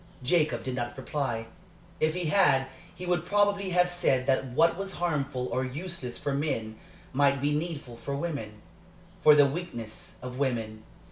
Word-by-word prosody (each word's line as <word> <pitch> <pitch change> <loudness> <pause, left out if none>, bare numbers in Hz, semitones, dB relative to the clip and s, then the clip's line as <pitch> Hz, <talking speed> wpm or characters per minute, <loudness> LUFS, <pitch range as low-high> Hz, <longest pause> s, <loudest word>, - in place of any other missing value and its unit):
Jacob 155 +3 +2
did 130 - -3
not 120 0 -3
reply. 130 -4 -2 0.5
If 155 +1 +2
he 180 -1 -2
had, 150 -6 +4 0.3
he 180 +1 -7
would 175 -2 +1
probably 200 +1 +2
have 180 0 +3
said 135 -7 +1
that 135 0 +2
what 155 +7 +3
was 195 +1 -3
harmful 140 -7 -1
or 130 +1 0
useless 135 -1 -5
for 145 -1 -2
men 115 -7 -2 0.4
might 140 0 +3
be 145 +2 +1
needful 150 -6 -4
for 140 +4 -4
women 140 -9 -4 0.6
for 150 -2 +8
the 145 -1 +7
weakness 135 -8 -5
of 125 +1 -6
women. 115 -5 -1
140 Hz, 160 wpm, -28 LUFS, 125-170 Hz, 0.6 s, for